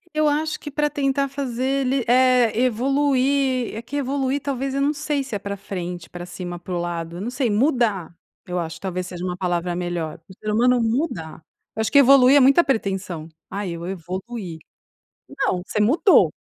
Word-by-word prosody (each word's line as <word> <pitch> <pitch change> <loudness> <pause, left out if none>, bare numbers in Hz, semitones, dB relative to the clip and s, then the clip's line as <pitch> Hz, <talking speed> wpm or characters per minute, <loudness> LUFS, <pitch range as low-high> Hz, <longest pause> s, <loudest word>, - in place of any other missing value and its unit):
Eu 305 0 +3
acho 305 +1 -1
que 295 - -7
pra 295 +1 0
tentar 275 0 0
fazer 265 -3 -4 0.2
ele, 260 -1 0
eh, 250 -2 +4
evoluir 265 +1 +1
é 225 - -4
que 250 +5 -8
evoluir, 275 0 0
talvez, 270 -1 -3
eu 275 - 0
não 290 +2 +2
sei 290 -1 -2
se 265 - -10
é 205 - -1
pra 200 0 -5
frente, 180 -3 -6
pra 175 0 -8
cima, 175 0 -6
pro 175 0 -4
lado, 170 -1 -4
eu 185 - -6
não 240 +4 -3
sei, 255 -3 0
mudar 215 - +1 0.3
eu 180 0 -3
acho 165 -1 -5
talvez 185 -1 -4
seja 175 0 -7
uma 180 -1 -3
palavra 175 -1 -1
melhor, 175 -2 -3
o 190 - -11
ser 215 - -3
humano 245 +3 +3
mudar 225 - -2 0.3
eu 220 - -1
acho 220 - -1
que 285 - +5
evoluir 270 0 +7
é - - +8
muita 275 +5 +6
pretensão, 190 - -2 0.2
"Ah 200 +1 -4
eu 170 0 -5
evoluí". 185 0 -6 0.7
Não, 180 - -1
você 215 - -2
mudou. 290 - +5
230 Hz, 190 wpm, -22 LUFS, 180-275 Hz, 0.7 s, é